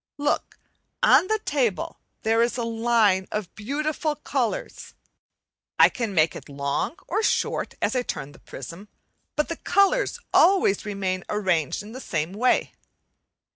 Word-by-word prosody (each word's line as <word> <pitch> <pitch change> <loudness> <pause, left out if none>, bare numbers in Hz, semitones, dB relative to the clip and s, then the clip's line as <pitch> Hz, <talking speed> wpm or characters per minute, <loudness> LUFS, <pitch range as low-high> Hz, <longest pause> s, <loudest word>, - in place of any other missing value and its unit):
Look! 290 0 -1 0.5
on 370 - +6
the 435 - +2
table 265 - -1 0.2
there 225 +1 +3
is 235 +1 +1
a 240 - -1
line 225 -4 +2
of 210 -3 -4
beautiful 300 +6 -2
colours. 270 -5 -3 0.8
I - - +8
can 225 -6 -4
make 160 0 +3
it - - -10
long 140 - -2
or 420 +5 0
short, - - 0
as - - +1
I 250 - +2
turn 145 - -5
the - - -17
prism, 170 +10 -9 0.5
but 300 - +1
the 335 - -4
colours 400 +7 +2
always 345 - +4
remain 190 -3 -2
arranged 185 -5 0
in 210 - -11
the 260 +3 -8
same 165 -2 -2
way. 245 +5 +1
225 Hz, 145 wpm, -25 LUFS, 190-290 Hz, 0.8 s, I